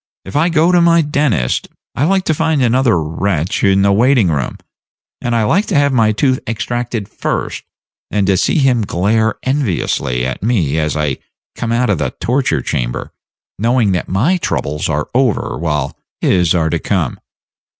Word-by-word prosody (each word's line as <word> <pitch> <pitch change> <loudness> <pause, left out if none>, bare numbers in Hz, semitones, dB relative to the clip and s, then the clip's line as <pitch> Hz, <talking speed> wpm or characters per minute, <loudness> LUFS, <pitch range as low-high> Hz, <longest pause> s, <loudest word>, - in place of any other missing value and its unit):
If 95 - -9
I 160 +4 +3
go 165 +1 +3
to 175 -1 +4
my 170 -1 +4
dentist, 140 - 0 0.3
I 140 - 0
like 190 +2 +2
to 160 - +1
find 160 -3 +1
another 120 -5 +3
wretch 80 +2 -2
in 95 -1 +4
the 100 - +4
waiting 115 -1 +3
room; 70 -6 -2 0.6
and 120 -1 -1
I 115 - +2
like 190 - +1
to 190 - -1
have 140 -1 +3
my 110 -3 +3
tooth 130 +4 +1
extracted 115 -1 -3
first, - - -3 0.5
and 105 -2 0
to 95 0 +2
see 95 - +1
him 130 -5 +3
glare 105 +3 +1
enviously 95 - -1
at 65 - -4
me 90 - +1
as 75 -1 -1
I 75 -3 -1 0.4
come 115 -1 -3
out 120 -1 +1
of 95 - 0
the - - -2
torture 125 - 0
chamber, - - -3 0.5
knowing 115 -1 +2
that 90 - -2
my 130 - +2
troubles 75 - -2
are 75 -1 -1
over, 125 -4 +1
while 75 -4 -2 0.2
his 90 -2 +2
are 80 -2 +1
to 85 - 0
come. 85 - -1
110 Hz, 175 wpm, -16 LUFS, 85-135 Hz, 0.6 s, to